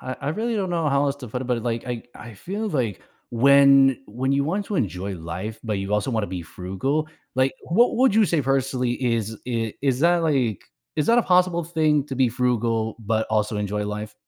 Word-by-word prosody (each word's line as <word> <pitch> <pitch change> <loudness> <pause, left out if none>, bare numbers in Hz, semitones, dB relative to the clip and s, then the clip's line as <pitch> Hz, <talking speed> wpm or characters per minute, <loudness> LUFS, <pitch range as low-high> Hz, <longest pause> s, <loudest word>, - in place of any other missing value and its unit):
I 130 - -4
I - - -3
really 225 +7 -2
don't 195 -3 -1
know 165 -3 0
how 140 0 +2
else 140 0 -1
to 130 -4 -9
put 125 +3 -4
it, - - -4
but, 125 -1 0
it 115 - -7
like 115 0 -3
I 120 -2 -4
I 115 -2 -10
feel 200 - -4
like 125 - -2 0.3
when 135 +1 +6
when 125 +5 -2
you 140 0 +2
want 195 +7 -2
to 205 - -3
enjoy 95 - -2
life, 90 +7 -6
but 105 -3 -1
you 95 +1 -4
also 105 +5 0
wanna 110 -4 -1
be 90 -2 -5
frugal, 95 - -3 0.3
like, 130 +1 +2
what 230 +9 +2
would 255 -3 +4
you 220 0 +5
say 165 -4 +1
personally 130 -2 0
is 115 -3 -1
i 115 -3 -1
is 135 -2 0
that, 175 +2 +4
like 130 - 0 0.3
is 150 - +1
that 235 +1 +5
a - - +4
possible 180 -3 +2
thing 155 -3 +1
to 135 - -5
be 130 -1 +3
frugal 115 -2 0
but 110 0 -1
also 105 0 0
enjoy 105 0 -2
life? 105 +1 -5
125 Hz, 225 wpm, -23 LUFS, 110-150 Hz, 0.3 s, when